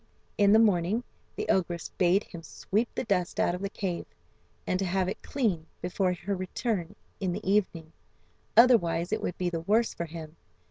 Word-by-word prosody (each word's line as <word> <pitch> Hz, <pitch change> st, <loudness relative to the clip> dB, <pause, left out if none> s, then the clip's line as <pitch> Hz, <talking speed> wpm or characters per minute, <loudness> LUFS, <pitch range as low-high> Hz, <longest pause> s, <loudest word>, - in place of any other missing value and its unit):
In 200 Hz, -1 st, +4 dB
the 215 Hz, -, +7 dB
morning, 210 Hz, +1 st, +3 dB, 0.3 s
the 425 Hz, -, -3 dB
ogress 175 Hz, -3 st, 0 dB
bade 185 Hz, +3 st, +2 dB
him 170 Hz, -, -10 dB
sweep 215 Hz, +7 st, -2 dB
the -, -, -1 dB
dust 190 Hz, -6 st, -1 dB
out -, -, +2 dB
of 180 Hz, -, -5 dB
the 200 Hz, -, -2 dB
cave, 185 Hz, -4 st, -4 dB, 0.6 s
and 185 Hz, -, 0 dB
to 195 Hz, -, 0 dB
have 185 Hz, 0 st, 0 dB
it 190 Hz, -, -4 dB
clean 195 Hz, -, -1 dB
before 180 Hz, +1 st, 0 dB
her 195 Hz, +3 st, -3 dB
return 185 Hz, 0 st, -3 dB, 0.2 s
in 190 Hz, -2 st, -1 dB
the 200 Hz, +1 st, -6 dB
evening, 180 Hz, -5 st, 0 dB, 0.6 s
otherwise 195 Hz, -8 st, +5 dB
it -, -, 0 dB
would -, -, -3 dB
be 180 Hz, -1 st, -1 dB
the 165 Hz, -1 st, -2 dB
worse 220 Hz, +7 st, +2 dB
for 170 Hz, -, -4 dB
him. 160 Hz, -1 st, -9 dB
185 Hz, 185 wpm, -28 LUFS, 175-210 Hz, 0.6 s, the